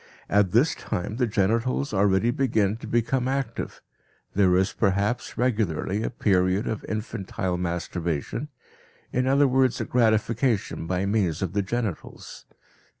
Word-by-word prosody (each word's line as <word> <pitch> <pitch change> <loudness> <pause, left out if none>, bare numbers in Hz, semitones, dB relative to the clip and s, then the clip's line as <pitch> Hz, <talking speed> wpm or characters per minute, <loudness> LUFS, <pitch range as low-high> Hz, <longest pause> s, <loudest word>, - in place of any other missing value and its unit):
At 100 -1 +4
this 125 - +4
time 105 +1 -4
the 125 -2 +2
genitals 115 +6 0
already 100 +3 +3
begin 110 -7 +1
to - - -9
become 120 +2 0
active; 135 -3 -3 0.5
there 95 -2 +4
is 95 0 +1
perhaps 100 +3 0
regularly 105 -5 0
a - - -1
period 95 -2 +1
of 110 -2 -3
infantile 95 -4 -3
masturbation, 85 -3 -3 0.7
in 125 +1 +1
other 140 +1 +4
words, 130 -1 +2
a - - -2
gratification 115 -4 +1
by 95 +2 0
means 100 -5 0
of 90 -2 -3
the 100 - +1
genitals. 105 -2 -5
105 Hz, 135 wpm, -25 LUFS, 95-120 Hz, 0.7 s, At